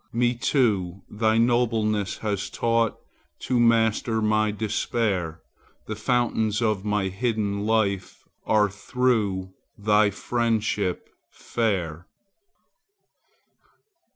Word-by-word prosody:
Me 120 +1 +2
too 105 -8 0
thy 110 +1 +1
nobleness 115 -4 +1
has 100 -3 -3
taught 115 -1 0 0.4
To 125 -2 0
master 115 -1 +2
my 110 0 +2
despair; 105 -5 -2 0.4
The 110 - -4
fountains 110 -2 0
of 110 -4 0
my 105 -2 0
hidden 105 -1 -1
life 100 -4 0 0.2
Are 105 -1 +4
through 105 -4 -1 0.2
thy 105 0 +3
friendship 110 -3 -1 0.2
fair. 90 -8 -2
110 Hz, 90 wpm, -25 LUFS, 100-115 Hz, 0.4 s, Are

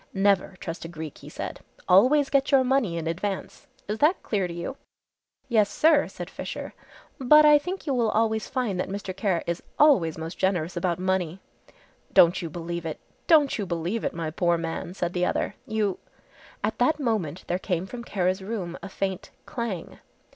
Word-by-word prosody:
"Never 195 -1 +2
trust 165 0 -6
a - - -5
Greek," 160 -3 -8
he - - -11
said, - - -6 0.3
"always 265 +10 +5
get 275 0 +2
your 270 -2 +6
money 250 -9 +1
in 165 - -3
advance. 190 - -4 0.2
Is 210 +2 -3
that 315 +6 +3
clear 195 -4 0
to - - -7
you?" 170 +10 -5 0.7
"Yes, 215 -5 +3
sir," 305 +4 +4
said - - -7
Fisher, - - -6 0.5
"but 300 +4 +7
I 295 -1 +7
think 365 +6 -5
you 285 - 0
will 235 -3 +2
always 220 0 +1
find 245 -8 -1
that 185 - -2
Mr. 195 -1 -5
Kara 190 -4 0
is 170 0 -2 0.2
always 195 - +4
most 160 +2 -6
generous 180 -3 0
about 175 -1 0
money." 185 -1 -1 0.7
"Don't 175 +1 +6
you 170 - -4
believe 170 +1 -5
it, 155 - -5 0.3
don't 295 -7 +5
you 200 - -2
believe 175 +6 -2
it, - - -2
my 165 -2 -3
poor 170 +1 +1
man," 165 +2 -4
said 175 -2 -2
the 180 0 +1
other, - - -1
"you 210 -3 -1 0.3
" - - -24
At - - -1
that 310 -1 +3
moment 210 - -1
there 180 - -1
came 180 -2 -2
from 235 +4 -8
Kara's 185 -3 0
room 190 -4 -5
a 195 - -7
faint 190 0 -3 0.2
"clang." 230 -8 -5
190 Hz, 190 wpm, -26 LUFS, 170-235 Hz, 0.7 s, but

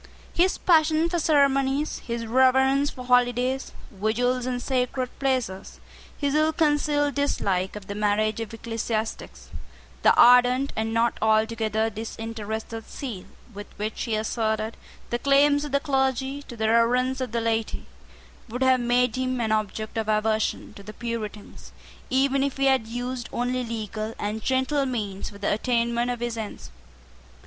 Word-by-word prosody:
His 365 +2 +2
passion 320 -1 +3
for 345 0 0
ceremonies, 280 -2 +2
his 235 -1 -4
reverence 265 +3 +3
for 250 -2 -9
holidays, 250 +1 +2 0.2
vigils, 240 +5 0
and 250 -1 -1
sacred 255 0 -1
places, 255 -8 -2 0.4
his 285 -1 -1
ill 310 +1 +3
concealed 295 -2 +1
dislike 195 -10 -1
of 210 -2 -8
the 200 - -5
marriage 210 +1 0
of 225 -2 -5
ecclesiastics, 225 -1 -4 0.5
the - - +6
ardent 250 +2 +5
and 220 0 -1
not 230 +1 +1
altogether 220 0 +1
disinterested 225 0 -6
zeal 235 -10 -6 0.3
with 205 +1 -8
which 215 +1 -3
he 230 -3 -1
asserted 220 0 -1 0.4
the 240 - 0
claims 285 +2 +4
of 295 - -6
the 280 - +3
clergy 265 -1 0
to 240 - -9
the 220 0 0
reverence 250 +3 +2
of 255 -3 -3
the 235 - 0
laity, 225 -1 -2 0.6
would 250 +4 -2
have 260 -1 +4
made 245 -1 +2
him 255 -1 -1
an 225 -2 0
object 215 +1 -2
of 220 -1 -3
aversion 215 0 0
to 205 - -12
the 210 +2 -10
Puritans, 220 -3 -6 0.4
even 270 +1 +2
if 275 -1 -1
he 275 - +1
had 265 -5 +3
used 245 +1 -4
only 250 +1 -1
legal 220 -1 -5
and 210 +2 -3
gentle 265 +3 +1
means 210 -6 -4
for 200 - -12
the 205 0 0
attainment 235 +1 0
of 245 -1 -3
his 240 -1 -3
ends. 205 - -7
240 Hz, 155 wpm, -25 LUFS, 220-265 Hz, 0.6 s, the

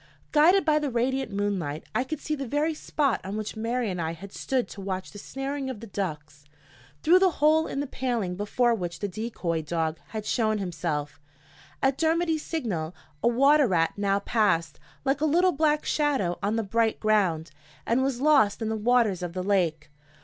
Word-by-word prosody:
Guided 345 +6 +5
by 305 -1 +4
the 295 -2 -1
radiant 260 +2 -1
moonlight, 195 -7 -2
I 250 - +1
could 280 +3 -5
see 310 - -3
the 275 -3 -3
very 295 +5 0
spot 290 -4 0
on 195 +3 -4
which 215 -1 -4
Mary 230 +2 -1
and 180 -1 -3
I 160 0 -2
had 190 +4 -11
stood 260 -2 -1
to 200 - -9
watch 190 -1 -4
the 205 - -10
snaring 270 +4 -4
of 255 -5 -5
the 230 - -8
ducks. 155 -8 -5 0.6
Through 355 +4 +6
the 380 0 +5
hole 310 +2 +4
in 275 - -3
the - - -2
paling 240 -9 -2
before 235 +5 +1
which 175 -6 -3
the 205 - -3
decoy 190 -5 -3
dog 160 0 -2
had 215 -1 -6
shown 215 -2 +1
himself, 155 -6 -3 0.6
at 270 0 +2
Dermody's 325 0 +1
signal, 185 - -3 0.3
a - - +2
water 275 +4 +5
rat 165 -4 +2
now 200 -1 +1
passed, 200 -7 +1 0.3
like 270 +2 +1
a - - +3
little 350 +5 +4
black 300 0 +1
shadow 270 - 0
on 205 +3 0
the 225 - 0
bright 225 +2 +1
ground, 185 -8 +1 0.3
and 235 +3 +2
was 265 -2 0
lost 280 -9 +4
in 220 - -1
the 220 - -1
waters 220 -4 +2
of 175 -1 -4
the 185 0 -3
lake. 165 -6 0
220 Hz, 195 wpm, -26 LUFS, 185-275 Hz, 0.6 s, Through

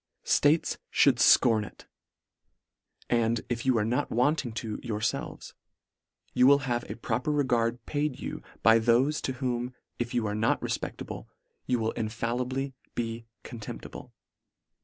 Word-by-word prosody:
States 150 +3 +3 0.3
mould 135 -4 +5
fcorn 115 -2 +5
it - - -12 1.2
And, 115 -1 +1
if 120 +1 -2
you 130 -3 +4
are 105 - +1
not 125 +6 0
wanting 125 +1 +1
to 110 -1 -4
yourfelves, 110 -2 -3 0.8
you 125 +1 +5
will 140 +1 +7
have 120 -2 -2
a - - -4
proper 120 +5 -1
regard 120 -5 +1
paid 145 -2 -2
you - - -5 0.2
by 115 0 +7
thofe, 120 +6 +2
to 130 - -2
whom 125 -1 -3 0.2
if 120 0 -3
you 120 -2 +1
are 105 - -1
not 110 +2 +1
refpeclable, - - -4 0.4
you 125 - +2
will 110 -1 0
infallibly 120 +4 -2 0.2
be 115 -1 -3 0.2
contemptible. 115 -3 -8
120 Hz, 140 wpm, -28 LUFS, 115-130 Hz, 1.2 s, will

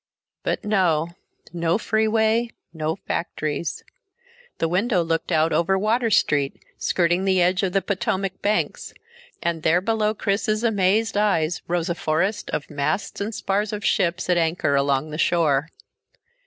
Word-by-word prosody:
But - - -2
no. 175 -6 +2 0.4
No 170 0 +1
freeway, 220 +1 +1 0.2
no 160 0 -2
factories. 155 -1 -3 0.7
The 165 - 0
window 185 +2 +1
looked 165 0 -2
out 160 +1 +2
over 190 +3 +2
Water 225 +4 +1
Street, 145 -9 +1 0.2
skirting 175 +1 +1
the 190 -1 +2
edge 180 +1 +3
of 190 -3 -1
the 195 - +1
Potomac 190 -1 -2
banks, 210 +1 -1 0.5
and 170 -2 -1
there 160 +3 +3
below 215 +2 0
Chris's 215 +2 0
amazed 210 -1 +2
eyes 180 -6 +1
rose 170 -1 -1
a 170 - 0
forest 170 +6 -1
of 145 - -3
masts 150 +9 -2
and 210 +2 -3
spars 200 +2 -1
of 210 -1 -4
ships 175 0 +1
at 180 -1 +2
anchor 160 -3 +1
along 140 +2 +1
the 155 - -5
shore. 160 -4 +2
180 Hz, 145 wpm, -23 LUFS, 165-210 Hz, 0.7 s, edge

